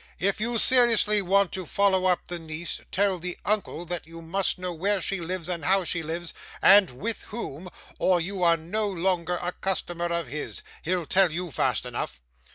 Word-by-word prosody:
If 200 +3 0
you 235 +1 0
seriously 230 -4 +5
want 195 0 +2
to 190 - -4
follow 190 0 +2
up 180 -1 +1
the 175 -1 -5
niece, 160 +1 -5
tell 195 -1 +1
the 180 +1 -5
uncle 200 -4 -1
that 175 -1 -4
you 165 0 -10
must 185 +5 0
know 180 -1 -4
where 195 +5 0
she 195 +2 -2
lives 175 0 -4
and 175 -3 -3
how 190 +1 +3
she 170 0 -1
lives, 165 +2 -5 0.3
and 195 -1 +7
with 210 - -4
whom, 185 -6 -6 0.3
or 185 -1 +3
you 185 +3 -4
are 170 -1 +4
no 205 +7 -2
longer 180 -1 -1
a 175 - -2
customer 175 -2 -2
of 170 -1 -1
his. 145 +4 -5 0.2
He'll 180 0 -1
tell 185 +1 +3
you 175 +1 -4
fast - - 0
enough. 60 - -5
180 Hz, 190 wpm, -26 LUFS, 170-195 Hz, 0.3 s, and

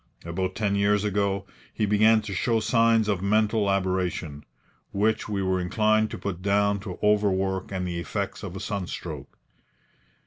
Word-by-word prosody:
About 95 +2 -3
ten 105 -2 0
years 100 0 +2
ago 100 -1 0 0.3
he 110 - -1
began 110 +2 +4
to 105 -2 -5
show 115 +4 +1
signs 115 -1 +3
of 100 -4 0
mental 105 +1 +2
aberration, 90 -6 -1 0.5
which 110 +2 0
we 100 -2 -1
were 95 0 +1
inclined 110 +4 +2
to - - -6
put 90 -3 -5
down 100 +1 +2
to 95 -2 -7
overwork 95 -2 +1
and 90 -2 -2
the 85 -1 -3
effects 85 - -4
of 90 - -7
a - - -5
sunstroke. 100 -3 -5
100 Hz, 160 wpm, -26 LUFS, 95-105 Hz, 0.5 s, began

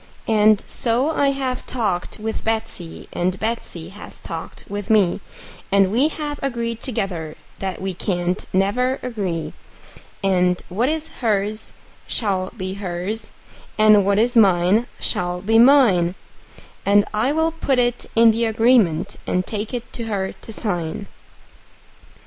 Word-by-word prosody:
And 215 -1 +4
so 245 +6 0
I 285 -3 +2
have 270 -2 -2
talked 205 -8 -2
with 220 +1 -4
Betsey, 220 -6 -3
and 185 +2 -1
Betsey 210 -7 -4
has 205 +2 -11
talked 165 -1 -8
with 205 +1 -5
me, 205 -5 +3 0.5
And 195 -1 +4
we 255 +7 +3
have 295 -2 -4
agreed 235 -4 -3
together 175 - -3 0.2
that 190 -2 -3
we 190 0 -3
can't 175 0 -1
never 250 +8 +1
agree; 195 -10 -3 0.7
And 180 -2 +2
what 225 +9 +1
is 315 0 -2
hers 215 -2 0 0.4
shall 190 -4 -1
be 185 -1 -4
hers, 195 +3 -4 0.5
and 215 -1 +6
what 200 +1 +2
is 240 +3 +2
mine 200 +1 +4
shall 180 0 -1
be 220 +4 +3
mine; 230 -10 +5 0.7
And 205 0 +4
I'll 295 +9 +1
put 290 -5 0
it 245 0 0
in 230 0 +7
the 230 +1 0
agreement, 225 -7 +2
and 185 0 0
take 210 -1 -4
it 240 -1 -6
to 235 - -4
her 195 -3 -2
to - - -12
sign. 190 -2 -3
210 Hz, 135 wpm, -21 LUFS, 185-235 Hz, 0.7 s, in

